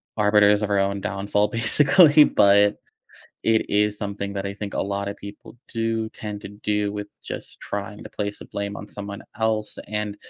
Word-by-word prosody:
arbiters 105 -1 +4
of 105 - -1
our 100 -1 +2
own 100 0 0
downfall, 100 +2 0
basically, 145 - +6
but 100 -3 +4 0.7
it 110 -1 +2
is 105 0 +1
something 100 -1 -4
that 100 0 -3
I 100 - -4
think 105 -1 -6
a - - 0
lot 100 0 -3
of 100 - -5
people 100 +4 -11 0.2
do 115 -1 -1
tend 105 -2 -7
to - - -7
do 105 0 -2
with 105 0 -5 0.2
just - - -7
trying 100 +1 -5
to - - -8
place 105 -1 -4
the - - -10
blame 100 0 -4
on 105 - -8
someone 100 0 -7 0.2
else, 110 -1 -1
and, 105 -1 -3
105 Hz, 185 wpm, -23 LUFS, 100-105 Hz, 0.7 s, basically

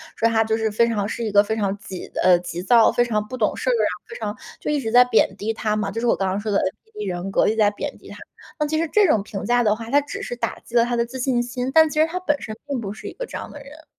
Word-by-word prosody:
说 230 - +2
她 225 -1 +3
就 220 0 +1
是 220 0 0
非 235 +3 +3
常 210 -3 -1
是 235 - -4
一 215 - -2
个 205 0 +6
非 220 +1 -2
常 200 -2 0
急 190 -2 -8 0.2
呃， 180 -1 +6
急 175 0 -6
躁， 230 +2 +5
非 240 - +2
常 215 -3 -1
不 255 - -6
懂 220 -4 0
事 - - -1
儿 - - +4
啊， 470 - +2 0.2
非 460 - -9
常 - - -4 0.2
就 - - -3
一 295 - +1
直 225 -5 -3
在 245 0 +9
贬 225 -5 +2
低 210 +2 -2
她 215 -1 -1
嘛， 215 -1 -1
就 225 - -4
是 240 - -2
我 - - +4
刚 195 -1 -1
刚 190 +2 -1
说 215 +1 -4
的 200 - +3
NPD 210 +2 -5
人 180 +2 -4
格， - - +3
一 - - +3
直 220 - -4
在 210 -2 +5
贬 205 - -6
低 - - -16
她。 - - -10 0.4
那 300 - +2
其 305 +1 -2
实 330 - 0
这 420 -2 +5
种 225 -10 +3
评 195 -1 -6
价 245 0 +3
的 215 -3 +2
话， 225 +1 -8
他 285 - +5
只 285 - -7
是 245 - -4
打 240 - -3
击 240 - -11
了 235 - +6
她 240 +1 -1
的 235 0 +1
自 260 +2 -8
信 250 -1 +1
心， 245 +1 -3
但 320 +1 +7
其 305 +1 -2
实 315 - +4
她 355 +3 -4
本 295 -6 -1
身 215 - -6
并 275 -4 -2
不 200 -3 -5
是 215 - -11
一 - - -7
个 - - -6
这 - - -6
样 - - -8
的 290 - -10
人。 300 +3 -14
230 Hz, 365 characters per minute, -22 LUFS, 210-255 Hz, 0.4 s, 在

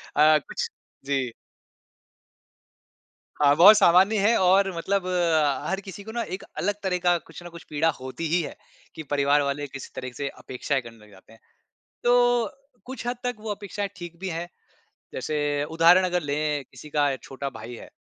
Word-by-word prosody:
अ, 155 0 +6
कुछ - - -2 0.4
जी। 135 -4 -1 2.1
हाँ, 145 -1 +4
बहुत 200 +6 +9
सामान्य 195 +2 +5
है 215 +4 +4
और 190 +1 +4
मतलब 195 +2 -1
अ, 160 -6 +1
हर 190 - -1
किसी 200 +1 -9
को 220 - -8
ना 235 - -2
एक 190 - -11
अलग 205 +2 0
तरह 185 -2 0
का 175 -1 +4
कुछ 165 0 -12
ना 175 - -8
कुछ 170 0 -12
पीड़ा 155 +2 +1
होती 130 +6 -5
ही 170 +3 +2
है 155 - -6 0.4
कि 160 - -6
परिवार 145 0 +3
वाले 145 +1 -2
किसी 140 -1 -9
तरह 130 -1 -5
से 140 - -2
अपेक्षाएँ 135 +2 -2
करने 115 -1 -12
लग 105 -1 -18
जाते 95 +3 -18
हैं। 115 - -19 0.6
तो 245 -1 +4 0.4
कुछ 260 -1 -7
हद 245 0 -2
तक 245 0 -1
वो 215 0 -5
अपेक्षाएँ 205 0 -4
ठीक 175 -2 -9
भी 190 0 -4
हैं 170 +1 -4 0.7
जैसे 145 +1 -1
उदाहरण 170 +3 +6
अगर 180 -1 0
लें 150 -1 -1
किसी 150 - -12
का 145 -2 +1
छोटा 135 +2 -6
भाई 120 -2 -9
है - - -11
165 Hz, 180 wpm, -25 LUFS, 145-195 Hz, 2.1 s, बहुत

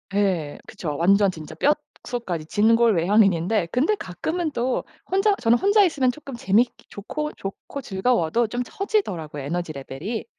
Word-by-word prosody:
예 185 -8 0
그쵸. 150 -4 -5
완전 195 +4 +4
진짜 155 -4 -10 0.5
뼛속까지 185 -10 -4
진골 225 +5 +3
외향인인데 185 0 +3
근데 305 +12 +2
가끔은 315 - -3
또 250 -1 -1 0.3
혼자 390 +2 +3
저는 230 +1 +4
혼자 405 - +4
있으면 285 -8 +2
조금 275 -1 -9
재밌기 230 +3 +1
좋고, 300 +9 -5
좋고 195 +8 -7
즐거워도 225 0 +1
좀 245 +3 -3
처지더라고요 190 - -2
에너지 170 +3 -3
레벨이. 145 - -5
210 Hz, 340 characters per minute, -23 LUFS, 175-255 Hz, 0.5 s, 완전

